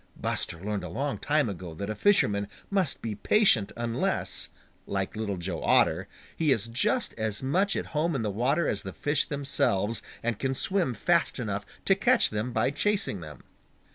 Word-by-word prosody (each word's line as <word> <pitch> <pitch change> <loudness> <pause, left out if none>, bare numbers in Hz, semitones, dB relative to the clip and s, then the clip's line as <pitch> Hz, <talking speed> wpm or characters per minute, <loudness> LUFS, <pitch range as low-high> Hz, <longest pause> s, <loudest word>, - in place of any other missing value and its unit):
Buster 85 - -2
learned 100 +1 -3
a 90 - -5
long 140 - -2
time 150 -3 +1
ago 90 -5 -6
that 100 +5 -4
a - - -1
fisherman 105 - +3 0.2
must 190 -8 +1
be 115 -2 -2
patient 115 - +3
unless, 115 0 -1 0.4
like 95 +1 -2
Little 105 -3 -2
Joe 85 -1 -4
Otter, 90 +4 +3 0.3
he 155 -3 +2
is 115 -5 +3
just 210 - +1
as 110 +1 -1
much 190 +9 +1
at - - -2
home 160 +1 +1
in 120 - -1
the 105 - -1
water 135 - +1
as 100 - 0
the 95 - -7
fish 145 0 0
themselves, 115 -7 +1 0.2
and 115 -3 -1
can 135 -1 -1
swim 175 -6 +1
fast 170 +10 +2
enough 105 -5 -3 0.2
to 195 - +5
catch 240 +6 +3
them 105 +4 -2
by 115 +3 +1
chasing 190 - +1
them. 75 -3 -10
115 Hz, 180 wpm, -28 LUFS, 100-150 Hz, 0.4 s, to